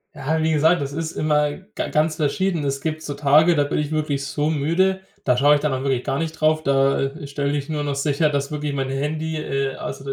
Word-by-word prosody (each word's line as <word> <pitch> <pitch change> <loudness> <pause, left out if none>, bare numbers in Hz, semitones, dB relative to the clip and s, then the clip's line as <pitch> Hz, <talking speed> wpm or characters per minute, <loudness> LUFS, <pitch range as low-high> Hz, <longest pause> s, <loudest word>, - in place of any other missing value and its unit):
Ja, 160 +3 -1
wie 160 0 +2
gesagt, 160 +2 +3
das 140 0 -4
ist 160 +1 -3
immer 150 -1 +1 0.2
ga - - -2
ganz 155 0 +1
verschieden. 165 +2 0
Es 135 -1 -1
gibt 155 +2 -3
so 145 -2 -5
Tage, 150 +4 +5
da 145 -1 +2
bin 145 - -2
ich 150 0 -2
wirklich 150 -3 -1
so 150 +2 -1
müde. 170 +6 +1 0.2
Da 125 - +3
schaue 145 +4 +5
ich - - +1
dann 150 -3 0
auch 130 - -2
wirklich 130 -3 0
gar 135 0 -1
nicht 160 0 -4
drauf. 155 0 +2
Da, 135 -1 +2
äh, 140 +1 -4
stelle 140 +1 -2
ich 140 0 -4
nur 150 -2 -2
noch 145 -1 -2
sicher, 145 +2 +1
dass 140 -1 -1
wirklich 150 -1 -3
mein 135 -1 -2
Handy, 155 +4 -2
äh 135 -3 -2
also, 135 - -7
150 Hz, 245 wpm, -22 LUFS, 140-155 Hz, 0.2 s, Tage